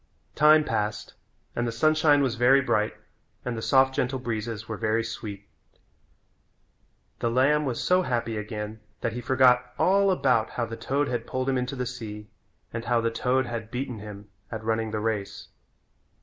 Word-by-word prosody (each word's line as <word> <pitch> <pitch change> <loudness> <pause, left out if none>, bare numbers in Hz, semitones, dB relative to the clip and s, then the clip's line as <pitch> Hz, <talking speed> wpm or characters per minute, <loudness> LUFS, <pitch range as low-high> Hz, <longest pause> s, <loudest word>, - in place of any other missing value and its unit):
Time 155 +1 +6
passed 105 -5 -2 0.4
and 120 0 0
the - - -1
sunshine 155 +3 +3
was 130 -4 +1
very 125 +3 +5
bright 110 -5 0 0.5
and 125 -1 -2
the 115 - -4
soft, 130 +2 +4
gentle 130 +1 -1
breezes 115 -3 -4
were 110 - -4
very 110 +1 0
sweet. 105 -3 -7 1.7
The 115 - 0
lamb 140 +5 +3
was 125 -4 -2
so 180 0 +3
happy 115 -7 -1
again 105 0 -5 0.2
that 115 - -1
he 120 - -4
forgot 125 0 +3
all 195 +1 +4
about 130 -11 +2
how 120 - -2
the 115 - -6
toad 140 +5 -1
had 120 -2 -3
pulled 130 +1 -2
him 135 - +1
into 125 +2 -3
the 125 -1 -2
sea, 105 -4 -7 0.4
and 115 +1 -4
how 120 0 +2
the 115 0 0
toad 130 +3 +1
had 115 -2 -5
beaten 125 -2 -4
him 105 -1 -9 0.2
at 110 -1 -5
running 110 0 0
the 110 0 -2
race. 105 -2 -3
120 Hz, 175 wpm, -26 LUFS, 110-130 Hz, 1.7 s, Time